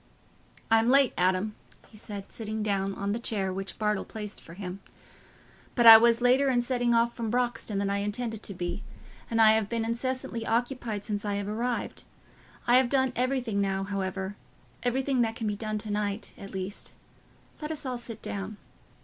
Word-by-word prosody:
"I'm 225 +1 +5
late, 275 -1 +5
Adam," 185 +4 +1 0.4
he - - -18
said, 205 -2 -8
sitting 220 -1 -4
down 195 -2 0
on 200 0 -2
the 225 - -1
chair 195 -5 -1
which 195 +1 -5
Bartle 210 -2 0
placed 210 -2 -7
for 165 - -12
him, 185 -1 -6 1.0
"but 240 - +3
I 225 -1 +13
was 235 +1 +4
later 260 +3 +4
in 245 -2 +3
setting 240 -1 +1
off 235 +1 +3
from 230 -2 -3
Broxton 240 -3 -1
than 200 0 0
I 200 - +1
intended 220 +2 -3
to 200 - -5
be, 175 +3 -3 0.5
and 230 - 0
I 220 -1 +8
have 220 -2 +1
been 230 -1 -1
incessantly 235 0 -2
occupied 230 -3 -1
since 205 -2 -2
I 205 -1 -1
arrived. 225 +4 -3 0.6
I 240 +1 +6
have 255 -1 +3
done 260 -2 +2
everything 250 -4 0
now, 195 -1 0
however—everything 200 +7 -3
that 225 -1 0
can 225 - -4
be 210 -1 0
done 215 0 -3
to 210 0 -4
night, 205 0 -2
at 195 - -9
least. 190 +1 -6 0.7
Let 300 - -4
us 310 -2 -4
all 250 -2 -2
sit 230 -2 -8
down." 200 +1 -4
220 Hz, 180 wpm, -28 LUFS, 200-240 Hz, 1.0 s, I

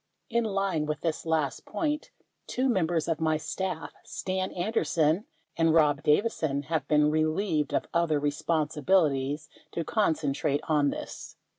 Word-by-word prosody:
In 235 0 +2
line 195 -7 0
with 150 - -2
this 165 0 -2
last 155 -4 0
point, 300 -2 -2 0.4
two 255 +2 0
members 170 -8 +1
of 165 -2 0
my 155 -1 +2
staff 185 +1 -4
(Stan 185 0 -3
Anderson 175 -2 +1 0.3
and 165 -1 +3
Rob 150 -2 +4
Davison) 150 -4 +1
have 155 -1 -2
been 150 0 +4
relieved 155 0 +1
of - - 0
other 170 -3 +2
re 145 0 +1
sponsibilities 150 -2 +1 0.3
to 170 - -1
concentrate 150 -7 0
on 150 -2 +3
this. - - -7
160 Hz, 140 wpm, -28 LUFS, 150-185 Hz, 0.4 s, Rob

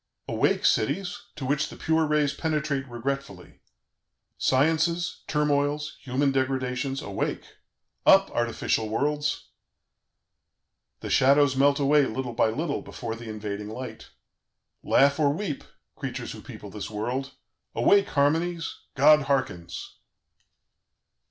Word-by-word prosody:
"Awake, - - +1
cities! 180 - 0
to 140 - -5
which 140 +2 0
the - - -10
pure 160 0 +1
rays 150 -2 +2
penetrate 150 -4 -1
regretfully! 120 -5 -5 0.8
Sciences, 165 +5 +1
turmoils, 150 0 0
human 135 +2 0
degradations, 130 0 -1
awake!... 100 -1 -3 0.6
Up, - - +6
artificial 115 -1 -1
worlds! 145 +5 -1 1.5
"The - - -5
shadows 140 0 +4
melt 140 +2 +3
away 145 0 +4
little 125 +1 -4
by 115 -1 +2
little, 145 +6 -2
before 115 -2 -6
the 115 0 -9
invading 105 -1 -5
light.... 125 +4 -8 0.7
"Laugh 140 +2 +3
or 145 -2 +4
weep, 160 -2 -4 0.3
creatures - - -5
who - - -9
people - - -10
this - - -6
world. 125 +6 -3 0.4
"Awake, 200 -1 +4
harmonies! 165 +4 0 0.2
God 150 +3 +6
hearkens! 85 -11 -2
140 Hz, 115 wpm, -26 LUFS, 125-150 Hz, 1.5 s, Up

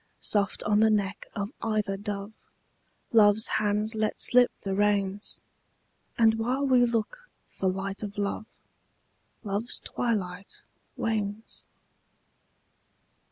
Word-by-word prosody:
Soft 205 -1 0
on 210 0 +2
the 220 0 +5
neck 205 -2 -1
of 205 0 -3
either 215 -3 0
dove 205 +1 -5 0.8
Love's 215 -1 +6
hands 210 +1 +1
let 215 -1 -1
slip 245 0 +5
the 195 -1 -2
reins: 205 0 0 0.8
And 225 -1 +4
while 255 +5 0
we 250 -2 +5
look 240 - -3 0.2
for 190 - -2
light 195 +1 -3
of 205 -1 -6
love 205 +2 -2 1.0
Love's 205 +3 -2
twilight 200 -5 -3 0.3
wanes. 215 -1 -3
210 Hz, 110 wpm, -28 LUFS, 200-225 Hz, 1.0 s, Love's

